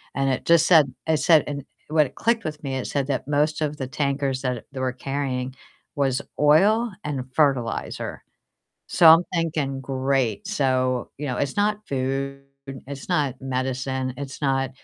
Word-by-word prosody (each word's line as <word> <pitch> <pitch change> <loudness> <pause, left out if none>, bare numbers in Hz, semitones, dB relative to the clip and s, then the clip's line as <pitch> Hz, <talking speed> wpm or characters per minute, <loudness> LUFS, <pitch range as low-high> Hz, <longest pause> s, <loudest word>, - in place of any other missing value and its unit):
and 135 0 +1
it 130 - -3
just 170 -1 +5
said 150 -7 +5
it 160 -1 +3
said 155 +1 +5
and 140 -1 -5 0.2
what 155 -3 +2
clicked 230 0 +1
with 150 0 -5
me, 135 -2 -3
it 130 - -4
said 140 -2 -1
that 135 -3 -2
most 150 +2 +1
of 150 -1 -1
the 135 - -3
tankers 140 -1 -1
that 125 -3 -3
they 135 - -7
were 130 -1 0
carrying 130 -1 -3 0.4
was 135 -2 +1 0.2
oil 205 +11 +4
and 140 -4 -3
fertilizer. 135 -6 0 0.7
So 170 - +4
I'm 165 +2 +8
thinking 155 -5 -1
great, 135 - -1
so, 130 - 0
you 145 - -4
know, 125 - -2
it's 140 -1 -1
not 210 +1 +1
food, 135 +1 -2 0.5
it's 140 -1 -8
not 140 -4 +1
medicine, 130 0 -2
it's 140 -1 -7
not 135 -1 +1
140 Hz, 165 wpm, -24 LUFS, 130-150 Hz, 0.7 s, I'm